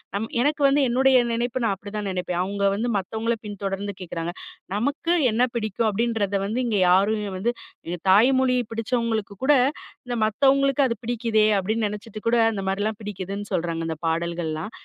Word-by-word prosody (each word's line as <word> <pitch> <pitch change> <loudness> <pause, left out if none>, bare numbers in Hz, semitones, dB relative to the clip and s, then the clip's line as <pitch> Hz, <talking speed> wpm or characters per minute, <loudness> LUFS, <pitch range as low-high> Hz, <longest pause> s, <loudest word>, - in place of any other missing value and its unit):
நம் 220 +2 -2
எனக்கு 295 +2 +1
வந்து 280 +1 +3
என்னுடைய 260 +1 +4 0.2
நினைப்பு 240 +1 -1
நான் 200 - +2
அப்பிடிதான் 205 +1 -5
நினைப்பேன். 180 -1 -2
அவுங்க 200 +1 -3
வந்து 235 +4 -1
மத்தவங்கள 220 +4 -2
பின் 205 -2 -7
தொடர்ந்து 195 0 -3
கேட்குறாங்க. 170 -1 -4 0.4
நமக்கு 285 +9 0 0.2
என்ன 235 +3 +2
பிடிக்கும் 220 0 -1
அப்பிடின்றத 215 -2 0
வந்து 230 +5 -1
இங்க 210 -4 +1
யாருமே 205 +3 +2
வந்து 235 +6 0 0.3
எங்க 175 0 -4
தாய்மொழி 255 +4 +4 0.2
பிடிச்சவங்களுக்கு 225 -2 -1
கூட, 295 - +6 0.5
இந்த 240 -1 -2
மத்தவங்களுக்கு 275 +4 +3
அது 230 - -2
பிடிக்குதே 230 -2 +1
அப்பிடின்னு 215 +3 0
நனச்சுட்டுகூட 220 +2 -2
அந்த 200 -2 -4
மாரிலாம் 205 +2 -2
பிடிக்குதுன்னு 200 0 -5
சொல்றாங்க 165 -2 -1
இந்த 160 -1 -3
பாடல்கள்லாம். 165 +2 -2
215 Hz, 155 wpm, -24 LUFS, 195-240 Hz, 0.5 s, கூட